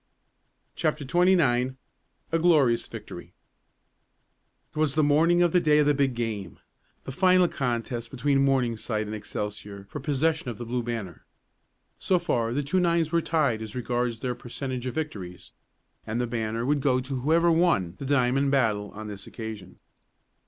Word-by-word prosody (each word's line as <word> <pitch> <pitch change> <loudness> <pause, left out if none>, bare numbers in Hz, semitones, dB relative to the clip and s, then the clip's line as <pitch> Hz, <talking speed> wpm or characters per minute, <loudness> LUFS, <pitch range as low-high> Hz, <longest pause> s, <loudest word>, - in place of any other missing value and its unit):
CHAPTER 145 - -1
XXIX 130 -6 +3 0.6
A 165 - +2
GLORIOUS 145 -9 +3
VICTORY 90 -6 -9 1.4
It - - -35
was 155 -2 0
the 155 - +3
morning 165 +4 +4
of 175 - +2
the 180 - +4
day 150 -3 +3
of 150 - +4
the 145 - +4
big 135 -3 +1
game 110 -7 -4 0.5
the - - -6
final 185 +4 +4
contest 120 -4 -3
between 135 +2 +1
Morningside 120 -5 0
and 105 - -6
Excelsior 105 -1 -6
for 150 - -5
the - - -12
possession 155 0 0
of 115 - -6
the 120 - -6
Blue 120 +2 -2
Banner. 115 -7 -5 0.8
So 185 - +2
far 120 -10 0
the 145 +4 -1
two 150 +7 +1
nines 170 -3 +1
were 170 0 +2
tied 150 -8 0
as 110 0 -7
regards 120 -1 -2
their 125 -2 -1
percentage 125 +1 -5
of 125 - -4
victories, 100 - -6 0.6
and 110 +2 -2
the 125 - +1
banner 115 0 -2
would 145 +1 +1
go 130 -2 +2
to 130 +1 -4
whoever 165 +6 +3
won 160 - +2
the 140 - -5
diamond 135 0 +2
battle 110 -7 +1
on 110 +1 -7
this 100 -2 -8
occasion. 110 -5 -8
130 Hz, 165 wpm, -26 LUFS, 115-150 Hz, 1.4 s, morning